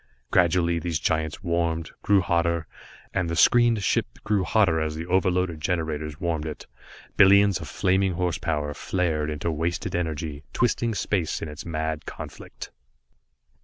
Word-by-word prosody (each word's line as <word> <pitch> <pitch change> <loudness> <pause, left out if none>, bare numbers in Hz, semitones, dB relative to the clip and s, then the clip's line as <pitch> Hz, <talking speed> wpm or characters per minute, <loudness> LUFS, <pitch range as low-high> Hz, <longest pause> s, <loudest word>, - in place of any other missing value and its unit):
Gradually 85 -1 +3
these 85 -1 -1
giants 80 +2 -1
warmed, 85 -2 -1
grew 100 -1 +4
hotter, 85 -1 0 0.5
and 90 -2 0
the 85 - -2
screened 120 +3 +4
ship - - +1 0.2
grew 100 -3 +1
hotter 90 -3 +2
as 80 0 -2
the 80 +1 -5
overloaded 90 -2 +1
generators 80 -3 -2
warmed 80 -4 -2
it. 75 - -7 0.5
Billions 100 -1 +6
of 80 - -7
flaming 95 +3 +1
horse 90 -2 -1
power 75 -1 -2
flared 80 -3 -1
into 75 +2 -2
wasted 85 +3 -2
energy, 80 -3 -3
twisting 115 -1 +1
space 95 -5 -1
in - - -3
its 75 +3 -8
mad 80 -1 -3
conflict. - - -9
85 Hz, 145 wpm, -25 LUFS, 80-95 Hz, 0.5 s, Billions